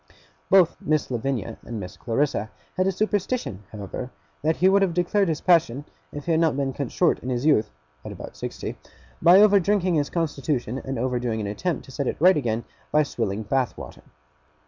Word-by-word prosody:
Both 190 Hz, -4 st, +5 dB
Miss 155 Hz, -3 st, 0 dB
Lavinia 120 Hz, -2 st, -3 dB
and 115 Hz, -2 st, -6 dB
Miss 90 Hz, -2 st, -7 dB
Clarissa 115 Hz, -3 st, -1 dB, 0.3 s
had 185 Hz, 0 st, +1 dB
a -, -, +3 dB
superstition, 205 Hz, -, -2 dB
however, 105 Hz, +4 st, -6 dB, 0.3 s
that 155 Hz, +2 st, +1 dB
he 185 Hz, -, +3 dB
would 195 Hz, +1 st, +5 dB
have 185 Hz, -4 st, +1 dB
declared 190 Hz, +3 st, +2 dB
his 155 Hz, -, -2 dB
passion, 155 Hz, -6 st, +3 dB, 0.3 s
if 145 Hz, -, -7 dB
he 170 Hz, -, 0 dB
had 160 Hz, -, +3 dB
not 160 Hz, -4 st, +2 dB
been 135 Hz, -1 st, -1 dB
cut 140 Hz, -3 st, -4 dB
short 175 Hz, -, +2 dB
in 125 Hz, -, -6 dB
his 125 Hz, +2 st, -1 dB
youth 110 Hz, -9 st, +3 dB, 0.3 s
(at -, -, -7 dB
about -, -, -9 dB
sixty) -, -, -6 dB, 0.4 s
by 175 Hz, +3 st, +7 dB
over 205 Hz, -1 st, +6 dB
drinking 190 Hz, -1 st, +1 dB
his 145 Hz, -3 st, +1 dB
constitution, 140 Hz, -6 st, -2 dB
and 135 Hz, -1 st, -4 dB
over 125 Hz, +1 st, -1 dB
doing 120 Hz, -2 st, -2 dB
an 105 Hz, -, -3 dB
attempt 140 Hz, -, -3 dB
to -, -, -13 dB
set 140 Hz, 0 st, -3 dB
it -, -, -2 dB
right 180 Hz, +4 st, +6 dB
again 120 Hz, -5 st, -1 dB, 0.3 s
by 150 Hz, 0 st, +4 dB
swilling 110 Hz, -6 st, -3 dB
Bath 130 Hz, +3 st, -1 dB
water. -, -, -10 dB
145 Hz, 200 wpm, -24 LUFS, 120-175 Hz, 0.4 s, by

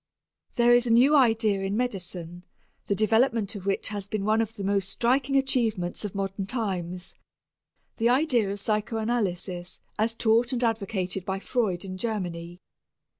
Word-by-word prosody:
There 240 Hz, -1 st, +5 dB
is 240 Hz, 0 st, +4 dB
a -, -, +1 dB
new 255 Hz, +6 st, +6 dB
idea 225 Hz, -6 st, +3 dB
in 195 Hz, +2 st, -1 dB
medicine 180 Hz, -7 st, -3 dB, 0.4 s
the 200 Hz, -, +1 dB
development 220 Hz, 0 st, +2 dB
of 200 Hz, -2 st, -8 dB
which 195 Hz, -, 0 dB
has 205 Hz, -2 st, -5 dB
been 200 Hz, -1 st, -3 dB
one 215 Hz, +1 st, +3 dB
of 225 Hz, 0 st, -4 dB
the 200 Hz, -, -6 dB
most 195 Hz, -1 st, 0 dB
striking 260 Hz, +5 st, +1 dB
achievements 230 Hz, -10 st, +1 dB
of 210 Hz, -1 st, -5 dB
modern 195 Hz, 0 st, -3 dB
times 185 Hz, -6 st, -3 dB, 0.8 s
the 230 Hz, 0 st, +2 dB
idea 250 Hz, -5 st, +2 dB
of 200 Hz, +1 st, -3 dB
psychanalysis 210 Hz, -4 st, -2 dB, 0.2 s
as 225 Hz, +1 st, +1 dB
taught 230 Hz, +2 st, +2 dB
and 250 Hz, 0 st, -1 dB
advocated 195 Hz, -5 st, -1 dB
by 190 Hz, +1 st, -2 dB
Freud 195 Hz, -4 st, -1 dB
in 185 Hz, -1 st, -6 dB
Germany. 175 Hz, -5 st, -4 dB
210 Hz, 155 wpm, -26 LUFS, 190-235 Hz, 0.8 s, new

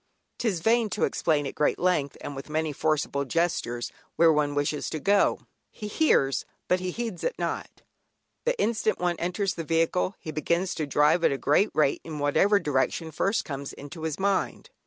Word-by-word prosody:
'Tis 200 Hz, -8 st, 0 dB
vain 225 Hz, +2 st, +3 dB
to 210 Hz, -, -2 dB
explain 150 Hz, -3 st, +1 dB
at 135 Hz, -, -4 dB
great 150 Hz, -, +1 dB
length, 175 Hz, -6 st, 0 dB
and 145 Hz, -, -6 dB
with 135 Hz, +2 st, -8 dB
many 155 Hz, 0 st, -1 dB
forcible 150 Hz, -1 st, 0 dB
gestures, 135 Hz, -5 st, -1 dB, 0.2 s
where 165 Hz, -1 st, +5 dB
one 145 Hz, -1 st, +1 dB
wishes 145 Hz, +1 st, -1 dB
to 155 Hz, -, -4 dB
go; 200 Hz, +6 st, +3 dB, 0.3 s
"he 210 Hz, -, -7 dB
hears 170 Hz, -, +2 dB, 0.2 s
but 180 Hz, -, +2 dB
heeds 185 Hz, +2 st, -4 dB
it -, -, -1 dB
not." -, -, -4 dB, 0.6 s
The -, -, 0 dB
instant 220 Hz, -2 st, +1 dB
one 175 Hz, -1 st, 0 dB
enters 180 Hz, +3 st, -1 dB
the 165 Hz, -, -5 dB
vehicle 165 Hz, +4 st, +1 dB
he 155 Hz, -, -7 dB
begins 170 Hz, +4 st, 0 dB
to 155 Hz, -, -3 dB
drive 150 Hz, +4 st, +3 dB
at -, -, +4 dB
a 140 Hz, -, -1 dB
great 150 Hz, +10 st, +3 dB
rate 150 Hz, -2 st, +2 dB
in 160 Hz, -2 st, -6 dB
whatever 170 Hz, +8 st, +3 dB
direction 150 Hz, +1 st, -1 dB
first 195 Hz, +7 st, 0 dB
comes 140 Hz, -2 st, -5 dB
into 150 Hz, +3 st, -9 dB
his 160 Hz, -2 st, -2 dB
mind. 195 Hz, 0 st, -1 dB
165 Hz, 180 wpm, -27 LUFS, 145-190 Hz, 0.6 s, where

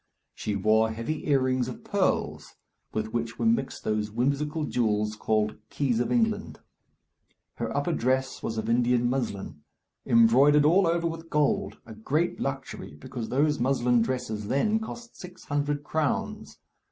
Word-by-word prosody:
She 105 Hz, -, -3 dB
wore 110 Hz, +3 st, +3 dB
heavy 115 Hz, +9 st, -4 dB
earrings 130 Hz, -3 st, +2 dB
of 125 Hz, -, -8 dB
pearls, -, -, -1 dB, 0.4 s
with 110 Hz, 0 st, -3 dB
which 115 Hz, 0 st, -2 dB
were -, -, -1 dB
mixed 230 Hz, 0 st, 0 dB
those 105 Hz, 0 st, -1 dB
whimsical 140 Hz, +7 st, -1 dB
jewels 105 Hz, -4 st, 0 dB
called 105 Hz, 0 st, 0 dB
"keys 130 Hz, -5 st, 0 dB
of 120 Hz, -, -1 dB
England." 225 Hz, -3 st, 0 dB, 1.0 s
Her -, -, -3 dB
upper -, -, 0 dB
dress 130 Hz, +2 st, 0 dB
was 110 Hz, -, -3 dB
of 110 Hz, 0 st, -2 dB
Indian 120 Hz, +1 st, +2 dB
muslin, 110 Hz, -, -3 dB, 0.5 s
embroidered 135 Hz, +6 st, +5 dB
all 180 Hz, +4 st, +5 dB
over 170 Hz, 0 st, +1 dB
with 165 Hz, 0 st, -6 dB
gold 150 Hz, -1 st, +1 dB
a 115 Hz, -, -10 dB
great 145 Hz, +11 st, -1 dB
luxury, 135 Hz, -, -5 dB
because 110 Hz, -, -7 dB
those 150 Hz, +3 st, +2 dB
muslin 125 Hz, -1 st, +2 dB
dresses 115 Hz, -4 st, -2 dB
then 210 Hz, -, +2 dB
cost 235 Hz, +2 st, -8 dB
six 180 Hz, 0 st, -11 dB
hundred 145 Hz, 0 st, -1 dB
crowns. 155 Hz, -1 st, -2 dB
130 Hz, 145 wpm, -27 LUFS, 110-150 Hz, 1.0 s, embroidered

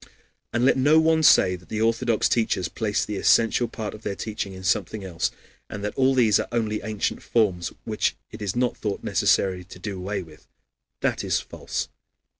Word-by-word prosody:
And 120 Hz, +2 st, +1 dB
let 135 Hz, -, +4 dB
no 145 Hz, +4 st, +5 dB
one 160 Hz, 0 st, +3 dB
say 90 Hz, -11 st, +6 dB
that 90 Hz, 0 st, -15 dB
the 110 Hz, -, -3 dB
Orthodox 115 Hz, 0 st, +2 dB
teachers 110 Hz, -6 st, +1 dB
place 110 Hz, -2 st, -1 dB
the 105 Hz, -, -4 dB
essential 115 Hz, +4 st, +3 dB
part 110 Hz, -3 st, -5 dB
of 110 Hz, -, -10 dB
their 100 Hz, -, -3 dB
teaching 105 Hz, -2 st, -4 dB
in 95 Hz, 0 st, -10 dB
something 95 Hz, +2 st, 0 dB
else, 85 Hz, -3 st, -1 dB, 0.4 s
and 105 Hz, -1 st, -6 dB
that 105 Hz, -, -2 dB
all 135 Hz, 0 st, +3 dB
these 115 Hz, -5 st, +4 dB
are -, -, -2 dB
only 110 Hz, -3 st, -1 dB
ancient 105 Hz, -1 st, -2 dB
forms, 95 Hz, -7 st, 0 dB
which -, -, 0 dB, 0.2 s
it -, -, -10 dB
is 100 Hz, -3 st, -2 dB
not 125 Hz, 0 st, +1 dB
thought 105 Hz, -2 st, -4 dB
necessary 95 Hz, -2 st, +2 dB
to 90 Hz, -, -12 dB
do 100 Hz, +2 st, -5 dB
away 100 Hz, +1 st, -3 dB
with. 80 Hz, -2 st, -17 dB, 0.5 s
That -, -, 0 dB
is -, -, +1 dB
false. -, -, -5 dB
105 Hz, 195 wpm, -24 LUFS, 95-115 Hz, 0.5 s, say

